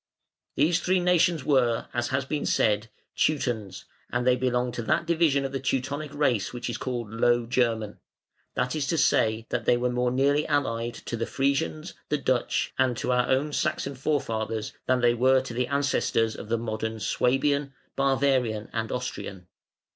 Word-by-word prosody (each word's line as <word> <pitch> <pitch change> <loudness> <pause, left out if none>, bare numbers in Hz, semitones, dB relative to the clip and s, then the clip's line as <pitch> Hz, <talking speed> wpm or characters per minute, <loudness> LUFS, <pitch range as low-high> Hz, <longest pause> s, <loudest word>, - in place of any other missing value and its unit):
These 165 +3 +3
three 185 +1 +2
nations 175 -3 +2
were, 125 -5 +2
as 120 0 0
has 130 0 -1
been 150 +1 -2
said, 105 0 +1 0.3
Teutons, 115 -10 -1 0.3
and 120 0 -1
they 125 0 +5
belonged 125 -1 0
to - - -3
that 115 +8 0
division 160 -5 +2
of 135 - -3
the 135 - -2
Teutonic 135 +3 -2
race 125 -9 +1
which 120 0 -4
is 115 - -4
called 120 -4 -4
Low 120 +1 +2
German, 115 -3 +1
man; - - -25 0.6
that 125 +2 -1
is 145 -3 -1
to 165 - 0
say, 110 -6 +2
that - - -2
they 120 - +4
were 125 0 0
more 125 0 +1
nearly 140 +4 +2
allied 120 -5 -1
to - - -6
the 115 0 -3
Frisians, 135 - -1 0.2
the - - +1
Dutch, - - 0
and 130 -3 +2
to 125 - -1
our 125 0 +2
own 145 +3 +1
Saxon 140 - -1
forefathers 115 -6 -2
than 130 -1 +2
they 120 0 +4
were 130 +2 +4
to 130 -2 -7
the 125 +1 -1
ancestors 140 -5 +1
of 105 - -9
the 115 - +1
modern 110 0 -3
Swabian, 135 +4 +1 0.2
Bavarian, 130 -5 +1
and 110 -1 -2
Austrian. 100 -7 -5
125 Hz, 175 wpm, -26 LUFS, 115-140 Hz, 0.6 s, they